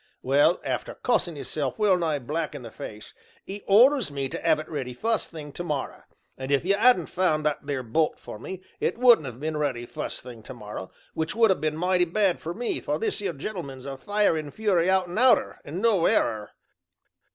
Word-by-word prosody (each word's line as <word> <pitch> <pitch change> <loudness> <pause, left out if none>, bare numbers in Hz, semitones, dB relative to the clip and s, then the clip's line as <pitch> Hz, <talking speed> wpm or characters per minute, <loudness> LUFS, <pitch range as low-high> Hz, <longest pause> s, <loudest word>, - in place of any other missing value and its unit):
Well, 140 +6 +4
after - - -3
cussin' 175 - 0
'isself 140 -2 -3
well 205 -3 +4
nigh 165 -4 0
black 150 +4 -3
in 140 - -7
the 115 - -9
face, 105 0 -9 0.3
'e 200 +2 -6
orders 250 - +5
me 135 -1 -3
to - - -5
have 160 -2 +3
it 155 0 -6
ready 130 -5 -5
fust 225 - -1
thing 150 -3 -8
to 175 - -6
morra, 150 -5 -4 0.3
and 130 0 -6
if 140 +3 +2
you 195 - +3
'adn't 205 -4 +4
found 155 -5 0
that 150 -1 -1
there 140 -3 -2
bolt 155 +7 0
for 105 - -9
me 185 - -7 0.2
it - - -1
wouldn't 235 - +6
have 125 -1 -8
been 155 +1 -2
ready 135 -5 -1
fust - - -5
thing 120 -3 -10
to 120 - -10
morra, 105 -4 -7 0.2
which 160 +4 -2
would 225 -3 +5
ha' - - -13
been 155 0 -1
mighty 180 +1 +2
bad 185 +1 +1
for 170 +2 -5
me, 240 +2 -2
for - - -2
this 430 - -2
'ere 190 -4 -2
gentleman's 140 -5 -6
a 140 -1 -5
fire 205 +6 +1
and 150 -2 -5
fury 190 -5 +2
out 190 -1 +3
and 175 +5 -4
outer, 255 0 +3
and 170 +8 -6
no 210 -7 +4
error." 105 -2 +1
160 Hz, 215 wpm, -26 LUFS, 140-195 Hz, 0.3 s, wouldn't